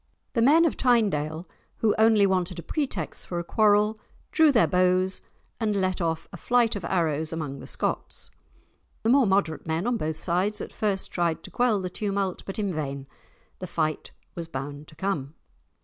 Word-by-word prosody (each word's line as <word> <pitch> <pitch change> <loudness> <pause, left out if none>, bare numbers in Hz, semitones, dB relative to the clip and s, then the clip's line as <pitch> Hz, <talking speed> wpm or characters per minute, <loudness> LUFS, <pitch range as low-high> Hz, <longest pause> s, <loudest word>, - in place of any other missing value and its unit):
The 230 - +1
men 310 +8 +6
of 325 - +1
Tynedale, 180 - +1 0.3
who 220 -2 +2
only 220 -2 +5
wanted 185 -2 0
a 170 - -6
pretext 260 - -3
for 175 - -4
a 170 - -2
quarrel, 210 +3 +3 0.3
drew 320 -3 +5
their 235 -5 +5
bows 185 +1 +2 0.4
and 215 -3 0
let 185 -2 0
off 165 -1 -1
a - - -6
flight 235 +2 +2
of 200 - -5
arrows 160 -3 0
among 150 -4 -4
the - - -9
Scots. - - -4 0.7
The 225 - +3
more 265 -3 +5
moderate 190 -6 0
men 160 +4 -1
on 240 -1 +1
both 155 -5 -2
sides 190 +6 0
at - - -7
first 200 -3 -1
tried 170 -2 0
to - - -10
quell 240 -4 +2
the 185 - -3
tumult, 200 -2 -2
but 195 - -5
in 200 -4 -1
vain. 140 -3 -4 0.5
The 185 - -5
fight 155 -3 -2 0.2
was 170 -1 -6
bound 145 0 -6
to 155 - -16
come. 160 -6 -3
185 Hz, 180 wpm, -26 LUFS, 160-215 Hz, 0.7 s, men